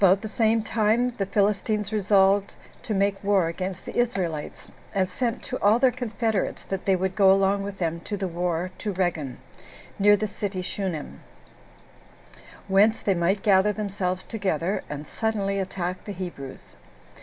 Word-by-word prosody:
1. 195 - +8
About 195 - -3
the - - -3
same 220 0 +2
time 225 +3 +2
the 195 - 0
Philistines 210 +1 0
resolved 200 -1 +3 0.3
to - - -7
make 200 +1 +1
war 200 -3 +3
against 185 +2 -5
the - - -7
Israelites, 185 -11 -2 0.2
and 190 -1 +2
sent 235 +6 -2
to 255 - -4
all 210 +3 +5
their 255 0 +4
confederates 225 -4 -2
that 195 -1 -4
they 195 - +4
would 185 0 -1
go 195 -2 +6
along 195 +1 +3
with 195 0 -5
them 170 -2 -1
to 205 +4 -5
the 190 -1 -2
war 175 0 -2
to 210 - -2
Reggan, 175 -8 -2 0.6
[near 205 +1 +6
the 215 - -1
city 195 -2 -4
Shunem,] 180 -5 -4 1.5
whence 205 +3 +4
they 195 - +1
might 185 +3 0
gather 200 0 +4
themselves 195 -3 -2
together, 190 -4 -1
and 150 +1 -5
suddenly 200 0 -1
attack 185 -1 -3
the 205 - -6
Hebrews. 175 -8 -8
195 Hz, 165 wpm, -25 LUFS, 185-210 Hz, 1.5 s, 1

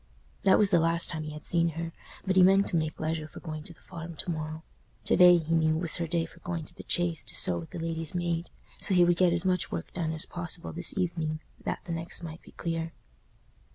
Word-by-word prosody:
That 190 - +7
was 205 -1 +3
the 175 - +5
last 165 +1 +3
time 160 -2 -3
he 150 - -5
had 150 0 -9
seen 170 -1 +2
her; 165 0 -3 0.3
but 190 -1 +1
he 190 - +7
meant 195 +2 +6
to - - -2
make 155 -1 -1
leisure 155 -1 -2
for - - -11
going 155 -2 -6
to 170 - -9
the - - -26
Farm 170 -2 -8
to 175 - -3
morrow. 155 0 -5 0.4
To - - +3
day, 180 -1 +8
he 165 0 -2
knew, 160 -1 +3
was 170 0 0
her 170 - -2
day 165 0 +1
for 165 - -16
going 170 -2 -4
to - - -13
the - - -10
Chase 170 -3 +1
to - - 0
sew 85 -1 +2
with 80 - -9
the - - -8
lady's 165 0 -4
maid, 170 -1 -1 0.3
so 190 - +2
he 175 -1 +6
would 175 0 +3
get 180 -1 +4
as 170 +1 0
much 180 -2 +1
work 85 -1 -5
done 165 -3 -2
as 160 0 +1
possible 170 -1 -5
this 175 +4 +3
evening, 165 -4 -1 0.3
that - - -2
the - - -5
next 165 +1 -3
might 165 0 -7
be - - -17
clear. 165 -1 -3
165 Hz, 255 wpm, -29 LUFS, 160-175 Hz, 0.4 s, day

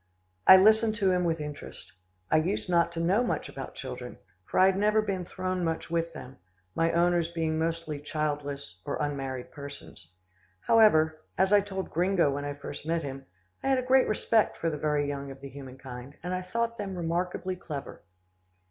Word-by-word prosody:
I 190 - +11
listened 220 +3 +5
to 195 -4 +2
him 180 -1 +1
with 165 -1 0
interest. 150 -1 -8 0.4
I - - +5
used 175 +7 0
not 170 -1 +3
to 165 - -4
know 185 +8 +3
much 240 - -2
about - - -8
children, - - -7 0.3
for - - -1
I 185 - +8
had 190 0 +4
never 210 +2 +3
been 195 -4 -1
thrown 185 0 -3
much 165 0 -2
with 165 0 0
them, 130 -3 -10 0.3
my 165 0 +2
owners 170 0 +2
being 160 -2 -1
mostly 165 -2 -2
childless 145 - -4
or - - -3
unmarried 135 -3 -3
persons. 140 - -10 0.5
However, 160 - +4 0.2
as 190 +2 +3
I 205 - +7
told 190 -1 -5
Gringo 175 -3 +2
when 145 +1 -3
I 145 0 -4
first 145 0 -8
met 165 +1 -1
him, 135 -1 -7 0.3
I - - -3
had 270 -1 +4
a 255 - 0
great 260 +1 +4
respect 215 +1 +2
for 165 - -1
the - - -3
very 150 -1 +1
young 140 -1 -4
of 135 0 -9
the 140 0 -8
human 135 -1 -10
kind, 130 +1 -9
and 180 +1 -3
I 185 - -1
thought 230 +5 -2
them 195 -2 -4
remarkably 175 +2 -2
clever. 150 -6 -7
165 Hz, 190 wpm, -28 LUFS, 145-190 Hz, 0.5 s, I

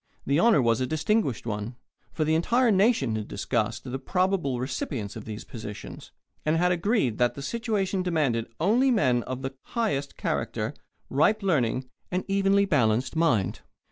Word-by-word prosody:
The 140 +3 +2
honour 220 - +5
was 115 0 +2
a 130 - 0
distinguished 155 - 0
one, 105 +1 -4 0.4
for 155 - -1
the 155 - +2
entire 230 +9 +3
nation 195 - +3
had 110 -1 -4
discussed 110 +3 -2
the 130 0 -4
probable 180 -5 0
recipients 130 -4 -3
of 110 - -8
these 110 0 -6
positions, 105 -3 -9 0.3
and 155 +1 +2
had 180 +2 +3
agreed 175 - +1
that 120 -1 +2
the 140 - -7
situation 205 - -1
demanded 150 -10 0
only 230 - +3
men 130 - +3
of 130 +2 -6
the 135 0 -3 0.2
highest 145 -12 -1
character, - - -2 0.4
ripe 200 +10 +3
learning, 130 -8 +1 0.2
and 180 +1 -2
evenly 200 0 +3
balanced 130 - +1
mind. 145 - +1
145 Hz, 160 wpm, -27 LUFS, 120-195 Hz, 0.4 s, honour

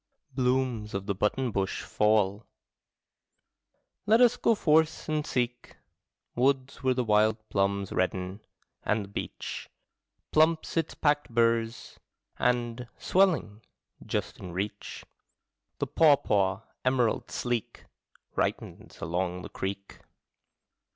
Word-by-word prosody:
Blooms 125 -5 0
of 100 0 -3
the 100 - 0
button 115 +6 0
bush 95 -2 -2
fall. 105 0 +1 1.6
Let 220 +2 +6
us 245 -1 +6
go 230 - +2
forth 160 -3 +2
and 155 -1 0
seek 120 -1 -2 0.6
Woods 130 +1 +1
where 130 -2 +2
the 125 - +1
wild 110 0 +3
plums 100 0 0
redden 95 +1 -1 0.4
and 105 0 0
the - - -15
beech 100 - -6 0.6
Plumps 155 +1 +3
its 165 -2 -1
packed 145 -1 +1
burs: 115 -1 0 0.4
and, 120 0 0
swelling, 175 - +2 0.4
just - - -3
in 90 -2 -8
reach. 100 +3 -5 0.7
The - - -1
pawpaw, 105 - +3 0.2
emerald 130 -3 +1
sleek. 120 -3 -3 0.5
Ripens - - -3
along 90 +2 -2
the - - -8
creek. 100 +1 -5
115 Hz, 110 wpm, -28 LUFS, 100-135 Hz, 1.6 s, Let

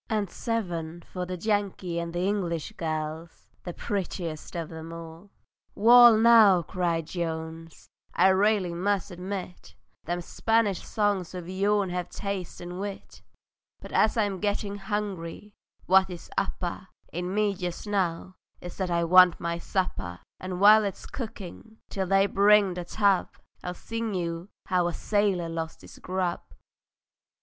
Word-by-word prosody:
And 210 -4 -1
seven 175 -7 -3
for 180 +1 -6
the 185 0 -4
Yankee 195 -3 -1
and 170 0 -5
English 175 -3 -1
girls, 160 0 -5
The 175 - -6
prettiest 180 -6 -4
of 165 -2 -4
them 160 0 -8
all! 165 +3 -10 0.5
"Wall 235 +1 +8
now," 220 -6 +6
cried 170 -1 -1
Jones, 165 -1 -5 0.3
"I 185 +2 +5
railly 195 -2 +2
must 195 +2 -1
admit, 180 0 -7 0.3
Them 175 +2 -2
Spanish 220 +1 0
songs 205 -4 -1
of 175 -2 -6
yourn 195 +1 +1
hev 180 -1 -3
taste 200 -3 -5
and 175 +1 -7
wit; 200 0 -7 0.6
But - - -11
as 220 - +3
I'm 205 -4 0
gettin' 205 0 -1
hungry, 205 -2 -4 0.3
what 190 +1 +5
is 175 -2 -9
upper 190 -1 -3 0.3
In 180 +2 -3
me 210 -1 +2
just 180 0 -5
now 185 -3 -2 0.2
is 175 - -9
that 190 -2 -2
I 170 -1 +1
want 180 +1 +6
my 170 0 -2
supper; 95 - -3 0.2
And 185 -1 -5
while 215 +2 +8
it's 200 -2 -4
cookin', 220 -2 -8
till 190 -2 -2
they 195 +1 +4
bring 200 -1 +4
the 175 -1 -5
tub, 200 -1 +1 0.3
I'll 180 0 -4
sing 230 -1 -4
you 170 +1 -3 0.2
how 180 -2 +1
a 175 - -2
sailor 205 -5 +1
lost 165 -1 -5
his - - -14
grub." 185 -1 -2
185 Hz, 145 wpm, -27 LUFS, 170-205 Hz, 0.6 s, Wall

